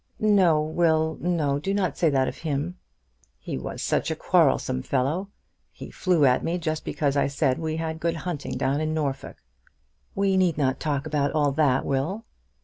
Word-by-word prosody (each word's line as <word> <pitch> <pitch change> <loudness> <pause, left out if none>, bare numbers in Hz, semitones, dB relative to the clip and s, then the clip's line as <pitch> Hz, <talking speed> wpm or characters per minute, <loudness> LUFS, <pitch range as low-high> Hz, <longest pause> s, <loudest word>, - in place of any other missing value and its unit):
"No, 185 -8 +4
Will; 160 0 +1
no; 155 -5 0
do 195 +6 -2
not 190 -4 0
say 165 - +2
that 135 -2 +2
of - - -5
him." 155 +2 -2 0.6
"He - - -6
was - - -5
such - - 0
a - - -1
quarrelsome 65 - +2
fellow. 145 - -1 0.4
He - - -10
flew 175 -6 +2
at 125 -1 +3
me 170 +2 -1
just 155 -2 -3
because 145 -2 -1
I 140 - +2
said 140 -2 0
we 160 -1 -2
had 160 0 -3
good 170 +1 -1
hunting 165 -3 -4
down 140 +2 0
in 155 0 -1
Norfolk." 140 -4 -3 0.8
"We 195 -1 +2
need 180 -5 +2
not 135 -3 0
talk 145 -2 -2
about 145 -2 0
all 145 -2 +2
that, 135 -3 +2
Will." 160 - -2
155 Hz, 180 wpm, -25 LUFS, 140-170 Hz, 0.8 s, No